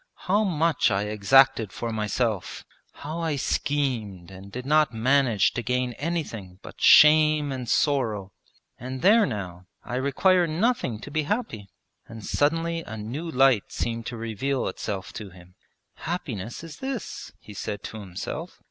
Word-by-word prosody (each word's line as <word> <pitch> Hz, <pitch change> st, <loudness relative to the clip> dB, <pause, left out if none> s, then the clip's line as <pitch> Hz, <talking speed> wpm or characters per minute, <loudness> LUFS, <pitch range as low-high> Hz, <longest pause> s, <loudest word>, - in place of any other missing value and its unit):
'How 205 Hz, +4 st, +3 dB
much 165 Hz, -7 st, +2 dB
I 100 Hz, -1 st, 0 dB
exacted 110 Hz, +1 st, +4 dB
for 115 Hz, +4 st, -4 dB
myself; 110 Hz, -1 st, -2 dB, 0.3 s
how 155 Hz, +3 st, -7 dB
I 160 Hz, -3 st, -1 dB
schemed 120 Hz, -11 st, -2 dB
and 95 Hz, +1 st, -11 dB
did 125 Hz, +4 st, -6 dB
not 150 Hz, -1 st, +3 dB
manage 120 Hz, -3 st, +3 dB
to 125 Hz, -, -2 dB
gain 125 Hz, 0 st, -1 dB
anything 115 Hz, -, -4 dB
but -, -, -12 dB
shame 150 Hz, -1 st, +6 dB
and 125 Hz, -3 st, -5 dB
sorrow! 110 Hz, -10 st, 0 dB, 0.5 s
and, 130 Hz, +3 st, -6 dB
there 210 Hz, +2 st, +6 dB
now, 90 Hz, -3 st, -6 dB, 0.2 s
I 125 Hz, -, -4 dB
require 175 Hz, +7 st, +3 dB
nothing 165 Hz, -, 0 dB
to 145 Hz, -, -9 dB
be 155 Hz, +1 st, 0 dB
happy;' 120 Hz, -, -3 dB, 0.4 s
and 115 Hz, -2 st, -10 dB
suddenly 165 Hz, +3 st, 0 dB
a 110 Hz, -8 st, -8 dB
new 130 Hz, +11 st, -5 dB
light 135 Hz, -7 st, +4 dB
seemed 115 Hz, 0 st, -3 dB
to 120 Hz, -, -5 dB
reveal 115 Hz, +4 st, -2 dB
itself 95 Hz, 0 st, -5 dB
to 105 Hz, -3 st, -7 dB
him. 90 Hz, 0 st, -17 dB, 0.4 s
'Happiness 120 Hz, -, -5 dB
is 165 Hz, -2 st, -9 dB
this!' 265 Hz, -4 st, -5 dB
he 105 Hz, -, -12 dB
said 100 Hz, +1 st, -5 dB
to 110 Hz, -, -7 dB
himself. 100 Hz, -, -7 dB
125 Hz, 150 wpm, -25 LUFS, 105-155 Hz, 0.5 s, shame